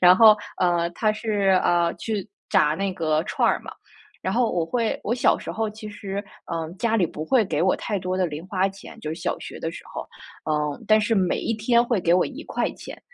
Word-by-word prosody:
然 180 +1 +8
后， 215 -1 +8 0.2
呃， 175 -1 +2
它 215 +5 +1
是， 205 -4 +2
呃， 170 -1 +2
去 215 -2 -4 0.2
炸 150 +1 +4
那 195 +2 -1
个 155 -3 +1
串 - - +1
儿 - - +1
嘛， - - -9 0.5
然 - - -1
后 240 -1 +2
我 170 -2 +1
会 230 +4 0
我 225 - +1
小 250 - +3
时 - - -6
候 220 -1 -1
其 215 0 -9
实， 200 -1 -5 0.3
嗯， 165 +1 -4
家 225 +1 +1
里 185 -6 +3
不 155 - -6
会 245 +4 +3
给 160 -4 -1
我 185 - +3
太 210 -3 -2
多 185 0 -2
的 185 - +2
零 155 0 -6
花 190 0 +1
钱 195 0 -12
就 155 0 -4
是 - - -7
小 - - -1
学 - - -8
的 - - -2
时 - - -10
候。 - - -5 0.4
嗯， 150 -1 -1
但 215 0 +5
是 215 +2 +1
每 185 -4 +2
一 230 - -1
天 235 +2 +3
会 235 -4 0
给 170 -1 +2
我 180 - +4
¥1， 290 +3 -5
195 Hz, 235 characters per minute, -24 LUFS, 170-220 Hz, 0.5 s, 然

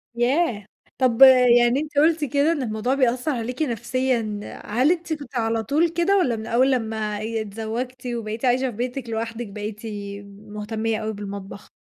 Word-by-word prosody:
ياه! 240 - +1 0.3
طب 255 -1 +1 0.4
يعني 240 +3 +3
أنتِ 300 -1 -6
قُلتِ 315 +1 +4
كده 285 +3 +2
إن 305 -5 -1
الموضوع 225 +2 -1
بيأثّر 255 +2 +1
عليكِ 250 +3 -4
نفسيًا، 240 -4 -1 0.3
هل 255 +9 +2
أنتِ 345 -2 -2
كنتِ 285 -4 -8
على 225 -1 0
طول 305 +7 +2
كده، 345 +4 +2
والَّا 250 -11 +2
من 220 0 -6
أول 255 +3 +3
لمّا 220 -3 -1
آآ 220 +1 -3
اتزوجتِ 225 +4 -5
وبَقيتِ 230 0 -4
عايشة 255 +1 +2
في 210 - -12
بيتِك 245 0 -4
لوحدِك 225 0 -4
بقيتِ 210 +1 -6 0.7
مهتمية 215 +1 -3
أوي 220 0 -3
بالمطبخ؟ 200 -1 -8
240 Hz, 160 wpm, -23 LUFS, 220-265 Hz, 0.7 s, قُلتِ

